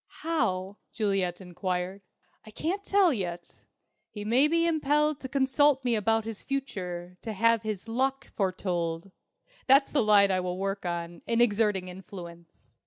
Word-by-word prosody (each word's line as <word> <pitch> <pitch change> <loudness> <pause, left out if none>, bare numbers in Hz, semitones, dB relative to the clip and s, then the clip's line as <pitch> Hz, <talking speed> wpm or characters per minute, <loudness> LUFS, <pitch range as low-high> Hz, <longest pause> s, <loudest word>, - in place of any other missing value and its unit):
"How?" 195 - -1
Juliet 195 -5 -1
enquired. 180 +1 -3 0.4
"I - - -13
can't 345 - -3
tell 390 -6 +4
yet. 175 -6 -5 0.5
He 205 -1 -7
may 250 +7 +4
be 335 +2 +2
impelled 300 -2 +1
to 260 - -7
consult 270 0 +2
me 245 - +2
about 225 0 +1
his 225 -2 -5
future, 180 -10 -5
to 220 - -5
have 230 +2 +3
his 215 -1 -4
'luck' 265 +4 -1
foretold. 180 -2 -2 0.6
That's 275 +1 +5
the 290 - +2
line 205 -2 +5
I 185 - +2
will 180 0 -3
work 195 -1 -3
on, 170 0 -4
in 230 0 +1
exerting 210 -5 +2
influence. 175 -2 -11
210 Hz, 150 wpm, -28 LUFS, 185-265 Hz, 0.6 s, That's